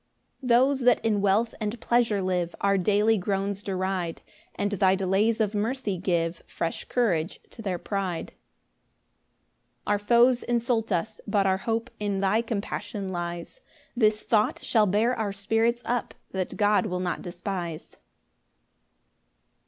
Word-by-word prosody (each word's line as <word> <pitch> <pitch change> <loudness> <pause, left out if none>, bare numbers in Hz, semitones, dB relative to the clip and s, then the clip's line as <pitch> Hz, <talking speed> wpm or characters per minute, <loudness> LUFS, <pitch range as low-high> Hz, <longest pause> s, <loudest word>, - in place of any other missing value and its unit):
4 260 - -7
Those 260 +3 +4
that 245 -2 +3
in 210 -3 +2
wealth 205 +4 +2
and 215 +2 -2
pleasure 230 -5 +2
live 180 -2 -1
Our 200 0 +2
daily 210 +3 +3
groans 195 +1 -2
deride, 185 -3 -2 0.3
And 205 0 -1
thy 190 -1 +3
delays 195 +4 +1
of 215 -1 +1
mercy 215 0 -1
give 170 -2 0
Fresh 165 - -3
courage 185 -9 0
to 230 - -10
their 190 -4 -2
pride. 190 -2 -3
5 - - -33 1.5
Our 205 0 +1
foes 240 +3 +4
insult 235 -2 0
us, 210 +5 -2
but 200 -1 +2
our 190 0 +3
hope 225 +3 -2
In 205 -2 -1
thy 200 +3 +2
compassion 205 -3 -4
lies; 175 - -5 0.3
This 215 -3 +2
thought 215 -2 +1
shall 215 -3 +3
bear 215 +6 +2
our 220 -4 -2
spirits 225 +4 0
up, 240 -1 -2 0.2
That 190 -1 -3
God 210 +1 +3
will 180 -2 -2
not 180 -1 -2
despise. 175 -2 -5
205 Hz, 145 wpm, -26 LUFS, 190-225 Hz, 1.5 s, Those